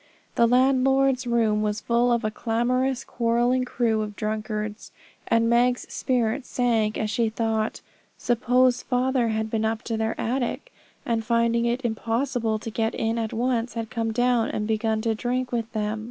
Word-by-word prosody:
The 235 - +4
landlord's 265 +1 +3
room 225 -3 +2
was 210 0 -1
full 240 +2 +1
of 235 0 +1
a 215 - 0
clamorous, 245 +4 0
quarrelling 240 +2 +1
crew 230 -3 0
of 210 -1 -5
drunkards; 215 0 -4 0.4
and 230 0 +3
Meg's 245 +1 +2
spirit 245 0 0
sank 230 -4 0
as 215 -1 -2
she 230 0 +1
thought 220 -1 -1 0.4
suppose 245 +1 +2
father 255 -1 +1
had 220 0 -2
been 220 -1 0
up 220 +1 -1
to 225 -1 -3
their 220 0 -2
attic, 255 - -2 0.3
and 230 -2 0
finding 235 +1 +1
it 240 +2 -1
impossible 230 0 -1
to 225 +1 -7
get 225 +1 -1
in 225 +1 -1
at 225 -1 -2
once, 240 0 -1
had 225 -1 -4
come 225 -2 -1
down, 245 0 +2
and 210 - -2
begun 220 0 0
to 225 0 0
drink 250 +3 -2
with 230 -1 -2
them! 215 0 -2
230 Hz, 170 wpm, -25 LUFS, 220-245 Hz, 0.4 s, The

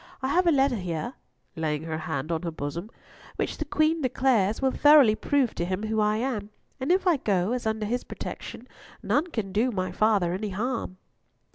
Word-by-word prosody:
I 265 - 0
have 355 +4 +2
a - - +6
letter 270 -4 +3
here," 180 +4 -4 0.4
laying 155 -1 -2
her 160 -1 -4
hand 155 -1 -3
on 165 - -1
her 175 - -3
bosom, 165 +5 -5 0.5
"which, - - -3
the - - -2
Queen 310 +1 +1
declares, 245 -6 +2
will 265 -1 +2
thoroughly 290 -7 +6
prove 265 +2 +1
to - - -3
him 185 +3 -2
who 220 0 -1
I 210 0 +2
am, 225 -4 -2 0.3
and 265 +5 0
if 375 +2 +2
I 350 -4 +4
go 195 -5 0
as 245 -2 -2
under 220 -1 -1
his 245 +4 -1
protection, 245 - -8 0.4
none 310 +5 +1
can 220 - -4
do 220 +6 +2
my 185 -5 -2
father 200 -3 +2
any 205 +3 -3
harm." 220 -1 -3
215 Hz, 200 wpm, -26 LUFS, 185-260 Hz, 0.5 s, a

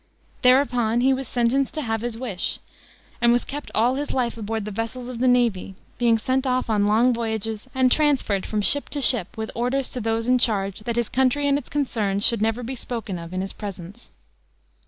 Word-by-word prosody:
Thereupon 250 -3 +3
he 265 +2 +4
was 265 0 -3
sentenced 250 +4 0
to 305 - -2
have 225 -2 -2
his 235 -1 -3
wish, 225 -7 -2 0.6
and 235 0 +5
was 240 0 +2
kept 290 +1 -6
all 235 +4 +3
his 290 +2 -3
life 245 -2 0
aboard 220 -1 -4
the 210 - -5
vessels 225 +4 -5
of 245 -2 -6
the 255 - +2
navy, 235 -6 +1 0.2
being 235 -2 +4
sent 260 +4 -1
off 255 -2 0
on 205 -1 +2
long 230 +4 +4
voyages 220 -1 -2
and 260 -1 +3
transferred 270 -10 +2
from 210 -1 -1
ship 285 +7 +2
to 290 - -4
ship, 235 -9 +1
with 220 0 -4
orders 250 +3 -1
to 250 - -4
those 225 +1 -1
in 250 0 +4
charge 200 -4 0
that 235 - -2
his 240 -2 0
country 265 +3 +1
and 280 - +3
its - - -13
concerns 215 -8 0
should 230 -3 +3
never 225 +3 0
be 250 +3 -4
spoken 225 -7 -5
of 170 0 -9
in 185 0 -2
his 195 - -4
presence. 200 +1 -9
235 Hz, 210 wpm, -23 LUFS, 220-255 Hz, 0.6 s, and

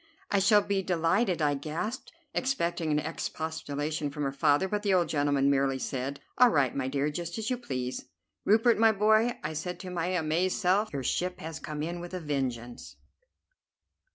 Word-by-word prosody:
"I 200 - +4
shall 205 +1 +5
be 200 -1 0
delighted," 175 +1 +1
I 145 -1 +3
gasped, 165 - -4 0.2
expecting 170 - 0
an 150 - +2
expostulation 155 -1 -3
from 145 +1 -4
her 135 - 0
father; 145 +5 +2
but 210 +2 -1
the 200 -2 +2
old 175 -2 +2
gentleman 145 -2 +2
merely 135 -1 +2
said: 135 +1 -3 0.2
"All 250 -1 +8
right, 140 - +2
my 130 -2 -1
dear; 140 +2 0
just 170 +2 -5
as 220 +2 -2
you 250 - 0
please." 125 - -4 0.4
"Rupert, 225 +2 +4
my 225 0 +6
boy!" 220 +3 +3
I - - -3
said 180 +4 -4
to 185 - -7
my 175 -1 -1
amazed 180 +1 0
self; 200 +4 +2
"your 140 -2 -3
ship 180 +7 -1
has 160 -1 -6
come 150 -1 -5
in 170 +2 -3
with 175 +1 -7
a - - -3
vengeance." 130 -6 -4
165 Hz, 180 wpm, -29 LUFS, 145-195 Hz, 0.4 s, All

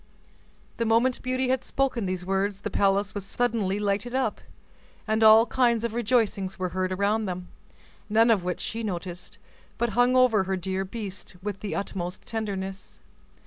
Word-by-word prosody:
The 230 - 0
moment 235 +3 +3
Beauty 255 0 -1
had 260 -1 +1
spoken 255 -6 -1
these 185 -1 -3
words, 195 +1 -1
the 210 - -4
palace 200 +1 +2
was 205 - -4
suddenly 215 -2 0
lighted 210 +4 -1
up, 265 - 0 0.7
and 220 +1 +2
all 220 +1 +8
kinds 240 -3 +2
of 235 -2 -2
rejoicings 220 -5 0
were 185 -1 -2
heard 185 +1 -2
around 205 +3 +1
them, 180 -1 -5 0.6
none 225 +2 +5
of 205 -5 +2
which 180 -1 -2
she 230 - -3
noticed, 180 -1 -5 0.4
but 235 0 0
hung 245 +2 +3
over 235 -6 +4
her 190 0 -1
dear 190 +1 -2
beast 195 -3 -7
with 205 -2 -4
the 210 - -4
utmost 185 -3 -4
tenderness. 195 -4 -5
205 Hz, 165 wpm, -26 LUFS, 190-230 Hz, 0.7 s, all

